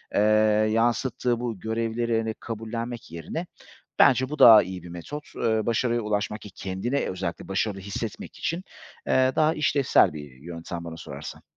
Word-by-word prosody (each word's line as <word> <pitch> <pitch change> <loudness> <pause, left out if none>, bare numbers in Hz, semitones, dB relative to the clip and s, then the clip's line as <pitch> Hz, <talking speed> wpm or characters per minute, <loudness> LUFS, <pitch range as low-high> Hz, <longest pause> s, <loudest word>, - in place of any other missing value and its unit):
eee, - - +4 0.5
yansıttığı 120 +1 +1
bu 120 -5 -4
görevleri, 115 +2 -1
hani, 110 0 -1
kabullenmek 115 0 -5
yerine 120 - -5 0.5
bence 130 -1 +5
bu 150 - -5
daha 110 -3 +10
iyi 90 -1 -7
bir 90 - -10
metot. 115 - -8
Iıı, 110 -1 0
başarıya 120 +1 +1
ulaşmak, 105 0 -2
ki 105 - -10
kendini 95 +9 -3
özellikle 85 -2 -4
başarılı 100 +1 -1
hissetmek 95 +1 -6
için, 170 +3 -2 0.4
eee, 130 0 +4
daha 155 0 +3
işlevsel 140 - +3
bir 75 -3 -8
yöntem 85 +1 -7
bana 80 -1 -7
sorarsan. 70 0 -8
110 Hz, 150 wpm, -26 LUFS, 95-120 Hz, 0.5 s, daha